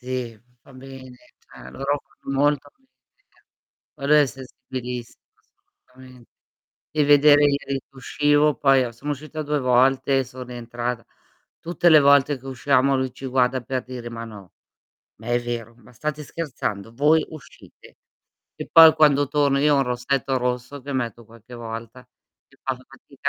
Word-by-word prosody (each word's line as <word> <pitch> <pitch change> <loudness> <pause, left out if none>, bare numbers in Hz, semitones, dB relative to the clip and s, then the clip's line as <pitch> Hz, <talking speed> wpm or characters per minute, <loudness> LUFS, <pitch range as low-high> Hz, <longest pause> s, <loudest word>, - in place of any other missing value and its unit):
Sì, 125 -3 -5 0.2
fa 135 - -19
bene, 130 -1 -12 0.2
cioè, - - -14
loro 140 +1 -2 0.2
fanno 135 0 -4
molto 145 0 +1
amicizia. 265 - -37 0.5
Poi 140 -2 -6
lei 150 0 +6
è - - +1
sensibilissima 125 -2 -8 0.5
assolutame 130 -1 -18 0.7
devi 150 -2 +1
vedere 145 0 +6
ieri 140 -1 -1
che 135 - -33
uscivo 145 +3 +1
poi 135 -2 +3
a 120 - -4
sono 140 +6 -6
uscita 155 +2 -6
2 150 -1 -1
volte 130 +2 +2
e - - 0
son 130 0 -9
rientrata. 120 -1 -5 0.6
Tutte 175 +1 +1
le 155 -1 +8
volte 140 0 +4
che 130 - -19
usciamo 135 +1 +1
lui 130 -1 -2
ci 135 - -10
guarda 130 0 +1
per 130 +1 -4
dire: 125 -2 -8
"Ma 115 0 -7
no, 100 -6 -12 0.7
ma 110 - -14
è 120 0 +1
vero, 120 -1 -5
ma 120 +1 -19
state 150 +4 -4
scherzando? 120 -9 -5
Voi 150 +5 +3
uscite?" 155 -3 -15 0.6
E - - -8
poi 160 -1 +9
quando 145 -2 +4
torno 145 -1 +1
io 150 +1 +3
ho - - +2
un - - +3
rossetto 130 +2 -1
rosso 125 +2 -3
che 140 +2 -6
metto 120 -3 -4
qualche 115 +2 -15
volta. 115 +1 -8 0.4
Che 135 - -26
fa 130 -1 -2
fatica 135 +2 -8
130 Hz, 160 wpm, -23 LUFS, 125-145 Hz, 0.7 s, poi